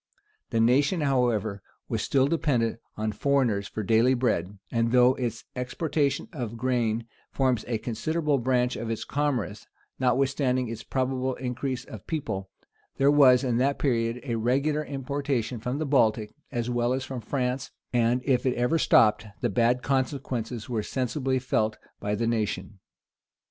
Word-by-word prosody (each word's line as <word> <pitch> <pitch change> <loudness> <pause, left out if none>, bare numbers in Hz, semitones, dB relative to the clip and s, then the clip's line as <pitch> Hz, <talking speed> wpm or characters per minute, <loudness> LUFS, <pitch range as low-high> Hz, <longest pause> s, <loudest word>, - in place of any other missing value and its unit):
The 115 - 0
nation, 140 +9 +3
however, 120 -7 +1 0.3
was 115 -3 -2
still 135 -1 +2
dependent 130 -7 0 0.2
on 110 0 -1
foreigners 115 -5 +1
for 110 - -5
daily 115 +5 +4
bread; 105 -6 -1
and 115 0 +1
though 125 0 +6
its 120 -3 -4
exportation 140 +3 -1
of 120 -5 -5
grain 115 -2 0 0.2
forms 130 -4 +1
a 120 -2 0
considerable 145 +7 -1
branch 125 0 +1
of 115 - -4
its 115 - -2
commerce, 130 -8 -2 0.3
notwithstanding 130 -1 +1
its 115 - -5
probable 130 0 -1
increase 130 0 -3
of - - -11
people, 100 - -3 0.5
there 140 +1 +5
was, 130 -4 +6
in 125 -3 +1
that 140 +3 +2
period, 115 -3 0
a 120 -5 -2
regular 140 +6 +1
importation 135 -4 -2
from 125 +4 -3
the 155 - -1
Baltic, 110 -6 +2 0.2
as 120 -1 -2
well 120 0 +1
as 130 0 -2
from 130 -3 -5
France 125 +2 -2 0.2
and 120 +1 +2
if 130 -3 +2
it 125 - +1
ever 125 +7 +1
stopped, 110 -4 +4
the 120 - 0
bad 120 +4 +2
consequences 125 -4 -2
were 115 -3 -1
sensibly 130 +3 -1
felt 110 -4 0 0.2
by 105 0 -1
the 115 +2 -1
nation. 105 -4 -2
125 Hz, 155 wpm, -27 LUFS, 115-135 Hz, 0.5 s, though